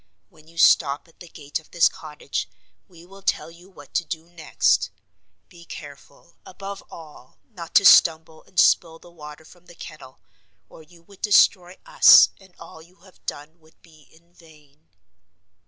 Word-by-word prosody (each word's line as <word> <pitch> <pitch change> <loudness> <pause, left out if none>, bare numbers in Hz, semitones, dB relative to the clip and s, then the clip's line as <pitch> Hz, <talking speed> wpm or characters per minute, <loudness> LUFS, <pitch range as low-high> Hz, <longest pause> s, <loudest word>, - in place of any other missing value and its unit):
When 155 0 -23
you 165 +1 -20
stop 145 -2 +2
at 165 - -27
the 175 - -13
gate 145 -2 -7
of 155 - -23
this 170 -1 +3
cottage 150 -1 -7 0.4
we 170 -2 -18
will 195 +2 -17
tell 165 - -3
you 175 +3 -19
what 145 -7 -18
to - - -1
do 160 0 -8
next. 110 - -1 0.6
Be 170 -2 -17
careful, 145 0 -14
above 195 +1 -10
all, 150 -6 -15
not 170 -5 -12
to 200 - +5
stumble 160 -2 +4
and 180 - -5
spill 165 -2 +2
the 175 - -19
water 150 -1 -13
from 175 +1 -21
the 175 - -16
kettle, 140 -6 -13 0.5
or - - -16
you 165 +2 -21
would 195 +2 -21
destroy 185 -4 +2
us - - +6
and 190 -2 -22
all 165 -1 -14
you 175 +3 -23
have 190 -1 -23
done 155 +4 -8
would 160 0 -27
be 155 -3 -22
in 170 +2 -26
vain." 155 -2 -23
165 Hz, 170 wpm, -22 LUFS, 155-175 Hz, 0.6 s, us